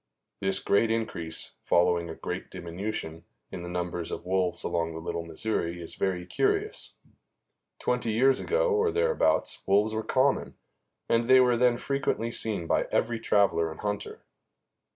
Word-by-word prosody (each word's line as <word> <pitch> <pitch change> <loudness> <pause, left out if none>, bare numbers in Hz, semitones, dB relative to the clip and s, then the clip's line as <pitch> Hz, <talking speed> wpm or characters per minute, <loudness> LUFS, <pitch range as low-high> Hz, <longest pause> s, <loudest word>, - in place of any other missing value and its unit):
This 95 0 +1
great 100 +3 +2
increase, 100 -8 -2
following 85 -1 +2
a 80 - -6
great - - -5
diminution, 85 -2 -5 0.3
in 90 - -6
the 90 - -6
number 90 0 -3
of 85 0 -5
wolves 90 -1 0
along 85 -1 -1
the 80 - -6
Little 85 0 -4
Missouri 85 0 -2
is 85 - -8
very 90 -2 -1
curious. 410 - -1 0.8
Twenty 125 -2 -1
years 130 +4 +4
ago, - - +1
or 440 0 +3
thereabouts, 470 +3 +1
wolves 105 +3 +3
were 110 - -1
common, 130 +5 +1 0.5
and 115 0 +2
they 130 0 +8
were 125 -1 +4
then 120 0 +3
frequently 125 -4 -1
seen 105 -7 -1
by - - +1
every 115 -1 0
traveler 100 -7 +2
and 80 - -9
hunter. 105 -1 -4
100 Hz, 150 wpm, -28 LUFS, 85-125 Hz, 0.8 s, they